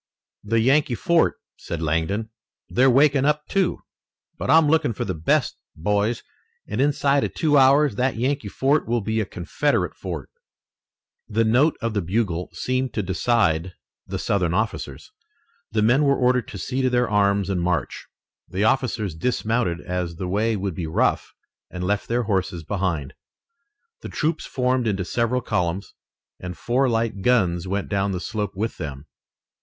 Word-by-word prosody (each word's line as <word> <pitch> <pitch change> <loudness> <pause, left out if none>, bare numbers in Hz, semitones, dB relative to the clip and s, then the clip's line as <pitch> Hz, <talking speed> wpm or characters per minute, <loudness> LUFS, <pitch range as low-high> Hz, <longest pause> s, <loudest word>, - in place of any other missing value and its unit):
"The 115 +2 +1
Yankee 130 +2 +3
fort," 170 +7 +2 0.2
said 85 - -5
Langdon. 85 +8 -1 0.4
"They're 130 +2 +4
waking 140 +1 +4
up, 150 0 +1
too. 195 -3 0 0.5
But - - -5
I'm 160 -1 +6
looking 155 -5 +2
for - - -3
the 95 - -2
best, 80 -1 0 0.2
boys, 105 +7 0 0.4
and 105 +5 -1
inside 140 0 +2
of - - -3
two 155 -3 +2
hours 140 -3 +5
that 130 +1 +1
Yankee 130 0 -1
fort 135 +8 +1
will 120 0 +1
be 110 +2 -1
a 105 - -1
Confederate 85 -3 -1
fort." - - -6 1.0
The 115 +2 +1
note 130 +8 +3
of 115 -1 -1
the 105 - 0
bugle 90 -1 -1
seemed 130 -2 -2
to 105 - 0
decide 95 -3 +1 0.3
the - - -3
Southern 90 -4 0
officers. 110 +3 -3 0.6
The 110 -1 +1
men 120 +6 +4
were 140 -1 +3
ordered 125 -1 +2
to 100 - -8
see 130 +7 -2
to 130 - +2
their 125 -1 +2
arms 100 -2 +2
and 95 -3 -1
march. 85 -1 -2 0.4
The 95 +2 -1
officers 110 -6 +1
dismounted 110 0 -1
as 90 -2 -3
the 90 +2 -4
way 110 +4 +1
would 100 -2 -3
be 80 0 -4
rough 80 - 0 0.4
and 90 0 -6
left 100 +2 -1
their 120 +1 0
horses 95 -5 -1
behind. 85 -6 -2 0.9
The - - -7
troops 160 +1 -1
formed 125 -2 0
into 95 -3 -1
several 120 +5 0
columns 100 -4 -2 0.5
and 90 0 -7
four 130 +2 +1
light 115 -3 -1
guns 95 -7 +2
went 100 +1 -2
down 100 -1 0
the 90 - -2
slope 105 0 -3
with 110 +4 -3
them. 70 -4 -6
110 Hz, 165 wpm, -23 LUFS, 95-125 Hz, 1.0 s, I'm